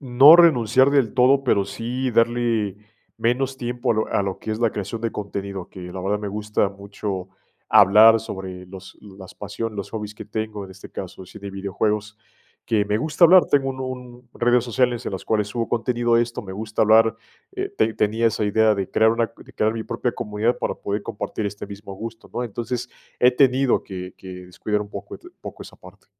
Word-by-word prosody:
no 135 +4 +8
renunciar 130 -5 +5
del 135 -7 +2
todo, 135 +2 +4
pero 100 -6 +2
sí 120 +6 -3
darle 115 -3 +1 0.4
menos 130 +3 0
tiempo 120 0 -1
a - - -2
lo 110 - 0
a 100 - +1
lo 95 -1 -3
que - - -6
es 110 - -2
la 115 - +3
creación 105 +3 -5
de 115 - -1
contenido. 100 -2 -5
Que, 95 - -11
la 95 - -5
verdad, 100 +3 -1
me 105 - -4
gusta 105 0 -1
mucho 100 -1 -6 0.4
hablar 110 +3 +7
sobre 95 -4 -7
los 95 0 -12
las 95 -2 -12
pasión, 105 +2 -5
los 100 - -5
hobbies 105 -1 -6
que - - -9
tengo. 110 -2 -4
En 95 - -12
este 95 +1 -13
caso, 95 0 -8
el 90 - -14
cine 100 +1 -9
y - - -7
videojuegos, 105 +2 -2 0.5
que 105 -2 +2
me 105 +1 0
gusta 155 +5 +3
hablar. 180 +2 +7
Tengo 135 -2 +2
un 130 0 -7
un 125 -1 -7
redes 120 0 +3
sociales, 120 0 0
en - - -3
las 95 - -5
cuales 105 -2 0
subo 115 +2 -3
contenido 120 0 0
de 120 - +4
esto. 120 -1 -5
Me 95 - -8
gusta 110 +2 -2
hablar, 110 +1 +5 0.4
eh, - - -3
ten 110 0 +1
tenía 110 +2 +1
esa 110 -1 0
idea 110 +1 +3
de 95 -2 -4
crear 110 0 +4
una 115 -1 0
de - - -15
crear 110 +1 +1
mi 115 - -4
propia 125 - -2
comunidad 110 +1 -1
para - - -2
poder 100 +1 -4
compartir 105 +1 -4
este 100 0 -6
mismo 100 0 -9
gusto, 115 +3 -9
¿no? 125 - -2
Entonces, 120 +2 -4 0.3
he 125 0 +6
tenido 130 0 +3
que 90 -1 -7
que 90 -1 -10
descuidar 105 +4 -2
un 105 - -12
poco, - - -8
et - - -28 0.2
poco, - - -9
esa - - -13
parte. - - -17
110 Hz, 210 wpm, -22 LUFS, 100-120 Hz, 0.5 s, no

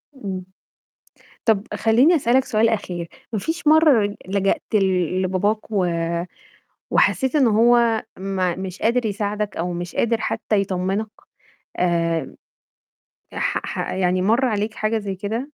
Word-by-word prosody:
إمم. 190 -7 -6 1.0
طَب 215 -3 +2
خلّيني 245 +10 +4
أسألك 260 -2 +2
سؤال 220 -1 +2
أخير. 180 -6 -3 0.2
ما 220 - 0
فيش 325 - -4
مَرّة 295 -10 +5
لجأت 195 +1 0
ل 200 -2 +4 0.4
لباباك، 200 +4 -1
و 195 -4 +1 1.0
وحسيت 265 +2 +2
إن 275 -4 +4
هو 230 0 +4 0.2
ما 185 -2 -1
مش 190 -1 -7
قادر 235 +1 +2
يساعدك، 210 0 -2
أو 175 +2 -2
مش 175 0 -6
قادر 230 0 +1
حتّى 215 -2 0
يطمنك؟ 195 +2 -2 0.7
آمم، 170 -2 0 1.0
ي - - -7
ح - - 0
ح - - -4
يعني 185 0 +1
مَر 230 +7 +3
عليك 215 -2 -1
حاجة 215 +1 -1
زَي 200 -2 -4
كده؟ 205 +4 -3
210 Hz, 135 wpm, -22 LUFS, 190-230 Hz, 1.0 s, مَرّة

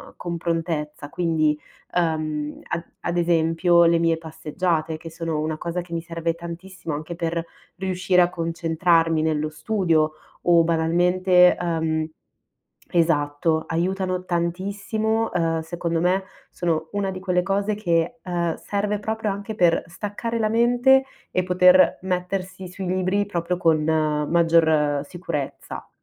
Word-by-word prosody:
con 170 -1 -4
prontezza. 160 -3 -3
Quindi, 155 -3 +1 0.4
uhm, 155 -3 -1
ad 170 0 -2 0.2
ad 175 - -2
esempio 170 +1 +3
le 170 0 +4
mie 165 -1 +2
passeggiate 160 0 -2
che 165 +1 -9
sono 165 -1 -3
una 155 0 -2
cosa 175 +2 -3
che 170 0 -14
mi 165 - -1
serve 165 -1 -2
tantissimo 170 0 -7
anche 155 +3 -5
per 165 0 -2 0.3
riuscire 185 -1 +2
a 175 - +4
concentrarmi 165 -1 +1
nello 155 -1 0
studio 160 -3 +1 0.3
o 170 -1 +5
banalmente, 180 +2 +4
uhm 160 -2 -1 0.8
esatto, 160 -1 +1
aiutano 185 +2 -1
tantissimo, 200 +6 -1
uhm, 165 -1 +1
secondo 170 0 -2
me 185 +2 +2 0.3
sono 160 -2 -1
una 200 -1 -1
di 185 - -6
quelle 180 -1 0
cose 200 +2 0
che, 175 +3 0
uhm, 170 -2 -1
serve 205 +1 -2
proprio 220 0 -2
anche 200 +2 -5
per 170 -3 +3
staccare 210 +5 -4
la 215 -1 +1
mente 245 +4 +4 0.3
e 185 - +1
poter 180 0 +5
mettersi 185 0 -3
sui 185 +1 -6
libri 185 +2 +1
proprio 175 -1 -2
con 160 -3 +2
maggior 155 -1 +2
sicurezza. 165 -5 -6
170 Hz, 130 wpm, -23 LUFS, 160-185 Hz, 0.8 s, o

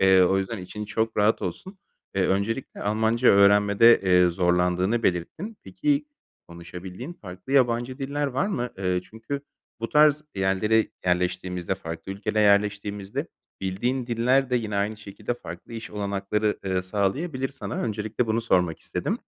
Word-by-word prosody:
Eee, 95 -1 +6
o 95 +2 +3
yüzden 95 +3 -3
için 95 +4 -7
çok 110 +1 -2
rahat 105 +2 +3
olsun. 190 0 -6 0.4
Eee, 95 -1 +2
öncelikle 105 +7 -2
Almanca 110 +4 +2
öğrenmede, 100 +3 +6
eee, 90 -1 +4
zorlandığını 90 +5 +1
belirttin. 155 - -2
Peki 295 -1 0 0.4
konuşabildiğin 90 - -8
farklı 95 - -9
yabancı 125 -1 +2
diller 145 +1 -2
var 135 +8 0
mı? 125 - -2
Iıı, 90 -1 0
çünkü 110 +9 -6 0.4
bu 115 - -2
tarz 150 0 +4
yerlere 100 +3 +2 0.2
yerleştiğimizde, 90 0 -1
farklı 85 +1 -7
ülkelere 105 +2 -1
yerleştiğimizde 100 -1 +1 0.3
bildiğin 120 +7 -1
diller 125 +3 +2
de 125 - +3
yine 110 -3 -2
aynı 105 +2 0
şekilde 105 +3 -5
farklı 85 +2 -10
iş 115 0 -7
olanakları, 105 +1 -1
ııı, 95 -1 0
sağlayabilir 130 - -1
sana. 120 -6 -6
Öncelikle 110 +2 -2
bunu 110 +1 +1
sormak 90 -6 +1
istedim. - - -2
105 Hz, 145 wpm, -25 LUFS, 95-120 Hz, 0.4 s, Eee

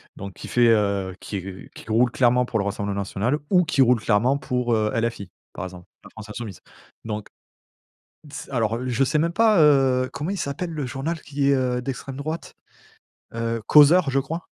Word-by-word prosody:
Donc 100 0 -8
qui - - -10
fait, 120 -1 +3
heu, 100 -4 +1
qui 100 - -5
r 95 0 -9
qui - - -12
roule 120 +3 +3
clairement 125 0 +3
pour 115 -2 -2
le 100 - -1
Rassemblement 100 0 -3
National 105 +8 -1
ou 180 -2 +4
qui 145 - +1
roule 125 -1 +3
clairement 120 +6 +2
pour, 125 -3 -1
heu, 110 -1 +1
LFI, 115 -4 -2 0.2
par 90 - -5
exemple, 90 -1 -10 0.2
La - - -13
France 110 -1 -11
Insoumise. 105 -4 -7 0.4
Donc 105 -2 -5 1.0
d 145 - -14
s - - -7
alors, 115 -4 0
heu, 125 +2 -4
je 125 +2 +2
sais 150 +4 0
même 170 +2 0
pas, 215 -2 +4
heu, 135 -4 +4
comment 150 +6 -4
il 200 - -2
s'appelle 145 +5 -3
le 155 -3 -4
journal 145 +6 -4
qui 140 -1 -1
est, - - +4
heu, 125 -2 0
d'extrême 135 +1 -6
droite, 155 +3 -5 0.8
heu, 115 0 -2
Causeur 150 +2 +6
je 135 +1 +2
crois? 160 +5 -5
125 Hz, 200 wpm, -23 LUFS, 110-140 Hz, 1.0 s, Causeur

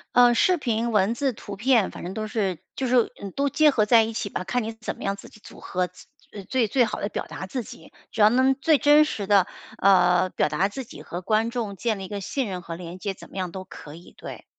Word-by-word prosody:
呃， 245 -1 +7
视 365 +10 +3
频、 235 -6 -1
文 210 +1 +3
字、 265 +2 -1
图 205 -2 -9
片， 230 -2 +3
反 - - -9
正 180 - -5
都 215 +1 -3
是 205 -5 -1 0.2
就 265 - -1
是， 245 -2 +3
嗯， 200 -2 -6
都 280 0 +1
结 300 +3 +4
合 225 -7 +2
在 225 +1 +6
一 225 - -4
起 215 -2 -3
吧， 185 - -4
看 245 +5 -1
你 220 - -4
怎 225 0 -6
么 - - -10
样 195 0 -1
自 - - -12
己 215 - -18
组 - - -13
合， 180 -1 -2
自 180 - -17 0.4
最 250 -4 +1
最 250 +2 +3
好 - - -5
地 200 - -2
表 - - -4
达 190 - -7
自 245 +5 -4
己。 245 +2 -13 0.2
只 220 - -1
要 210 - +8
能 260 +3 +3
最 300 +3 +3
真 295 +2 +6
实 210 -9 -4
地， 200 -3 +5 0.3
呃， 185 -2 +4
表 150 - 0
达 155 +6 0
自 265 +5 -6
己， - - -12
和 175 - -6
观 220 +4 +1
众 230 -4 -4
建 220 0 -2
立 190 - -6
一 - - -8
个 205 0 -5
信 260 +6 -2
任 185 -2 -5
和 165 -1 -7
连 175 0 -8
接， 195 +1 -3
怎 - - -14
么 - - -16
样 185 -2 -3
都 190 +1 -7
可 150 -5 -11
以， 170 +3 -14
对。 - - -9
215 Hz, 290 characters per minute, -25 LUFS, 190-245 Hz, 0.4 s, 要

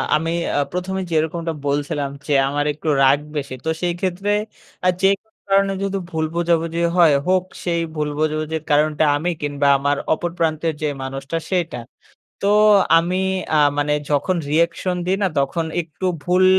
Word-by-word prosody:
আমি 165 +2 0 0.3
আ - - +3
প্রথমে 190 +1 -3
যেরকমটা 165 +1 0
বলছিলাম 145 0 -1 0.2
যে। 150 - 0 0.2
আমার 145 +1 -1
একটু 155 +2 -9 0.2
রাগ 135 +2 +5 0.2
বেশি। 140 -2 -4
তো - - 0
সেই 175 -1 0
ক্ষেত্রে 190 +2 -1 0.5
আ - - +5
যেকোনো 195 +3 +2 0.2
কারণে 195 0 +3
যদি 195 0 -1
ভুল 160 -2 -1
বোঝাবুঝিও 170 0 +1
হয়, 165 -4 +6
হোক। 185 0 +3 0.2
সেই 170 -2 0 0.2
ভুল 150 -1 -1
বোঝাবুঝির 155 0 -1
কারণটা 150 +1 +3
আমি 170 +4 -1
কিংবা 145 -1 0
আমার 145 +1 0 0.2
অপর 175 +2 -2
প্রান্তের 160 0 0
যে 150 - +1 0.2
মানুষটা 135 +4 -4
সেইটা। 175 -8 -1 0.7
তো 200 - +3 0.5
আমি 175 +2 -1 0.4
আ - - +4 0.2
মানে 145 0 +1 0.2
যখন 150 +5 +1
রিঅ্যাকশন 170 +3 +1
দিই 190 - +2
না 195 - +3
তখন 160 +4 -1 0.2
একটু 165 +3 -6 0.2
ভুল 180 +1 +3
165 Hz, 160 wpm, -20 LUFS, 150-180 Hz, 0.7 s, হয়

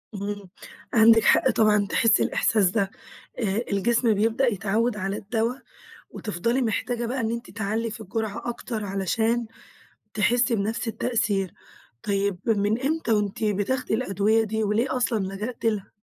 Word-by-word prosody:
إمم، 200 -1 -5 0.4
عندِك 225 0 +6
حق - - +4
طبعًا 210 -2 +3
تحسي 225 -2 +3
الإحساس 210 -5 +2
ده. 195 0 0 0.5
آآ، 215 0 0
الجسم 230 +3 +2
بيبدأ 225 +5 +1
يتعود 215 +2 0
على 195 0 -2
الدوا، 225 +3 -1 0.6
وتفضلي 230 +5 -2
محتاجة 240 +1 -1
بقى 250 +3 -2
إن 225 -1 -1
أنتِ 235 +1 -5
تعلّي 220 +2 -2
في 220 +1 -8
الجرعة 220 +2 -4
أكتر 230 -2 -4
علشان 220 +5 0 0.7
تحسي 240 +3 +2
بنفْس 220 +3 -2
التأثير. 210 -5 -1 0.5
طيب 200 -2 0
من 215 +1 +1
إمتى 305 -2 -1
وأنتِ 210 0 -1
بتاخدي 215 +5 0
الأدوية؟ 220 -1 +2
دي 220 0 -2
وليه 225 +6 0
أصلًا 240 -3 0
لجأتِ 220 +5 -5
لها؟ 215 -3 -1
220 Hz, 140 wpm, -25 LUFS, 200-235 Hz, 0.7 s, عندِك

